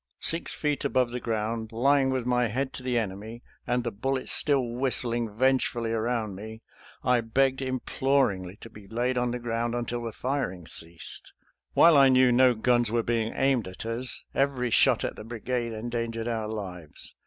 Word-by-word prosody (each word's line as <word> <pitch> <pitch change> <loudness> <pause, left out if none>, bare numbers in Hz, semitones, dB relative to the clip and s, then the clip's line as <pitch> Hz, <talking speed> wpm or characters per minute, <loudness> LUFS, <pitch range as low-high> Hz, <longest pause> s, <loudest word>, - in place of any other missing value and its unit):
Six 165 +1 +1
feet 150 -1 -1
above 130 -3 +1
the 125 - -3
ground, 110 -1 -2
lying 135 +4 +3
with 130 -2 -1
my 125 -1 +2
head 130 +5 -2
to - - -7
the 125 -1 0
enemy, 110 +2 -4 0.2
and 125 0 +1
the 120 - -2
bullets 130 +6 -2
still 140 -3 +3
whistling 120 -1 -1
vengefully 125 -3 +1
around 115 -2 -1
me, 110 +3 -9 0.4
I 125 -1 +3
begged 135 +4 +1
imploringly 130 -7 0
to 115 - -10
be 105 -2 -13
laid 120 +4 -1
on 125 0 +1
the 120 - -2
ground 120 0 -2
until 120 0 -3
the 115 -1 -4
firing 115 - -3
ceased. 80 +1 -3 0.4
While 170 -1 +7
I 135 -1 +7
knew 130 -1 +5
no 125 0 +5
guns 120 +1 +2
were 115 +1 +1
being 115 -1 0
aimed 135 -6 +2
at 95 +4 -8
us, 115 +3 -2
every 135 -3 0
shot - - +4
at - - -2
the - - -7
brigade 120 +1 -3
endangered 115 0 -3
our 110 -2 -2
lives. 95 -7 -6
120 Hz, 175 wpm, -27 LUFS, 110-130 Hz, 0.4 s, While